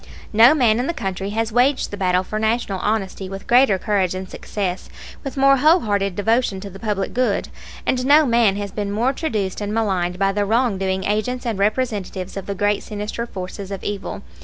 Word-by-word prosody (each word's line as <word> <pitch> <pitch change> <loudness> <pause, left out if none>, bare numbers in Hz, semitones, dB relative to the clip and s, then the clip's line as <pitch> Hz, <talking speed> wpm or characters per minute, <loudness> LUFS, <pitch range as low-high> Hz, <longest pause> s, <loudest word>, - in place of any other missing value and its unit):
No 230 +7 +7
man 235 -6 +3
in 250 - -1
the 340 - -2
country 195 -4 -3
has 225 +2 -1
waged 255 +4 +2
the - - -4
battle 185 -2 +1
for 215 +3 -4
National 220 -3 0
honesty 195 -2 -2
with 195 0 -7
greater 240 -5 +5
courage 190 -3 0
and 185 0 -5
success, 190 -1 -4 0.3
with 275 -1 -6
more 275 0 +5
whole 315 +6 +5
hearted 200 -3 -1
devotion 225 0 +1
to 200 0 -8
the 195 - -11
public 205 -3 -2
good; 255 +1 0 0.4
and 255 -1 +1
no 295 +4 +6
man 230 -5 +3
has 200 -1 -4
been 205 -1 -3
more 235 +6 +1
traduced 215 - -2
and 205 +1 -3
maligned 185 -5 0
by 195 +1 +2
the 205 +1 0
wrong 225 -1 +1
doing 190 0 -1
agents 215 +6 -1
and 225 -4 -2
representatives 205 -4 -1
of 195 - -6
the 200 - -3
great 205 +1 +1
sinister 210 +2 -5
forces 190 0 -7
of 195 -1 -6
evil. 205 -1 -5
205 Hz, 205 wpm, -21 LUFS, 195-235 Hz, 0.4 s, No